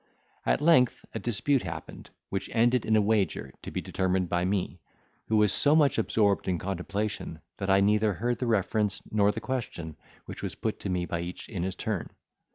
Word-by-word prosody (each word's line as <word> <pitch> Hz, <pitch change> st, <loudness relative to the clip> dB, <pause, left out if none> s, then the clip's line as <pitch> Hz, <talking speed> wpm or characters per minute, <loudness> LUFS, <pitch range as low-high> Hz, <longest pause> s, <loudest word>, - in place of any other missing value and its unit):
At -, -, +2 dB
length 150 Hz, -6 st, +4 dB
a -, -, -3 dB
dispute 120 Hz, +4 st, +1 dB
happened, 80 Hz, -1 st, -8 dB, 0.2 s
which -, -, -3 dB
ended 120 Hz, +1 st, +3 dB
in 110 Hz, -, +3 dB
a 110 Hz, -, +5 dB
wager, 100 Hz, -10 st, 0 dB
to -, -, -7 dB
be -, -, -3 dB
determined 95 Hz, -1 st, 0 dB
by 90 Hz, 0 st, +1 dB
me, 95 Hz, -2 st, -1 dB, 0.5 s
who 110 Hz, -, +2 dB
was 105 Hz, -1 st, +5 dB
so 145 Hz, +1 st, +4 dB
much 145 Hz, -6 st, +4 dB
absorbed 105 Hz, -2 st, +1 dB
in 90 Hz, -2 st, +1 dB
contemplation, 95 Hz, -1 st, -3 dB, 0.2 s
that 100 Hz, -1 st, -3 dB
I 95 Hz, 0 st, +5 dB
neither 105 Hz, +1 st, +3 dB
heard 120 Hz, +6 st, -1 dB
the 125 Hz, -, -1 dB
reference 105 Hz, -1 st, 0 dB
nor 105 Hz, -1 st, +3 dB
the -, -, -6 dB
question 90 Hz, -, -4 dB, 0.3 s
which -, -, -8 dB
was -, -, -4 dB
put -, -, -3 dB
to 100 Hz, -, -4 dB
me 90 Hz, -1 st, 0 dB
by 85 Hz, -, -3 dB
each 90 Hz, +1 st, -7 dB
in 95 Hz, -7 st, -4 dB
his 95 Hz, +1 st, -2 dB
turn. 100 Hz, -2 st, -3 dB
100 Hz, 195 wpm, -28 LUFS, 90-115 Hz, 0.5 s, a